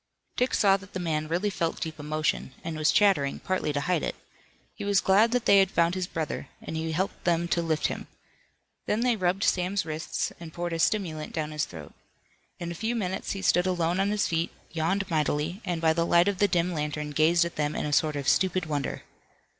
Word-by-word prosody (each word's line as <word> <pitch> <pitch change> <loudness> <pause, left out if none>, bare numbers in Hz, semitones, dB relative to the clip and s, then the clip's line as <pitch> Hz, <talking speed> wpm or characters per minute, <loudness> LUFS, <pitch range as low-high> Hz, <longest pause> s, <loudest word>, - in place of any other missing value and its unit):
Dick 250 +1 +1
saw 195 -2 +4
that 195 0 -15
the 185 - -3
man 155 -3 -1
really 180 +6 0
felt 165 -2 -2
deep 160 -1 -5
emotion 150 -3 -2
and 165 -1 -4
was 155 0 +3
chattering, 190 -10 +3
partly 185 -5 -1
to 145 0 -1
hide 175 0 +1
it. - - -2 0.6
He - - -7
was 200 -2 +3
glad 200 +5 +4
that 245 -1 0
they 200 - +7
had 190 -1 +4
found 170 -2 +2
his 185 -1 -2
brother, 160 -4 -4
and - - -7
he 160 0 -2
helped 185 +5 -2
them 170 -1 +1
to 170 - +1
lift 160 -2 0
him. - - -2 0.8
Then 215 - +1
they 245 -1 +3
rubbed 185 -1 0
Sam's 185 +1 +1
wrists 155 +1 -3
and 165 -2 -9
poured 175 -1 -3
a 165 - -2
stimulant 160 -5 0
down 155 -1 -2
his 150 -1 -1
throat. 80 -4 -10 0.6
In 170 0 -5
a - - -3
few 220 +7 -2
minutes 190 -4 -2
he 195 -1 -6
stood 180 0 +3
alone 175 0 0
on 195 +1 +2
his 210 0 +1
feet, 165 +1 0 0.2
yawned 175 +5 0
mightily, 155 +4 0
and 175 -2 -1
by 160 -1 +3
the 165 +1 +1
light 170 +2 +4
of 200 -3 0
the 205 - +5
dim 175 -1 +1
lantern 150 -1 -3
gazed 165 +3 +4
at 170 - -6
them 150 0 -1
in - - -2
a 150 - -2
sort 155 +1 +2
of 140 -2 -3
stupid 185 -2 +2
wonder. 145 -3 -3
170 Hz, 225 wpm, -27 LUFS, 155-190 Hz, 0.8 s, they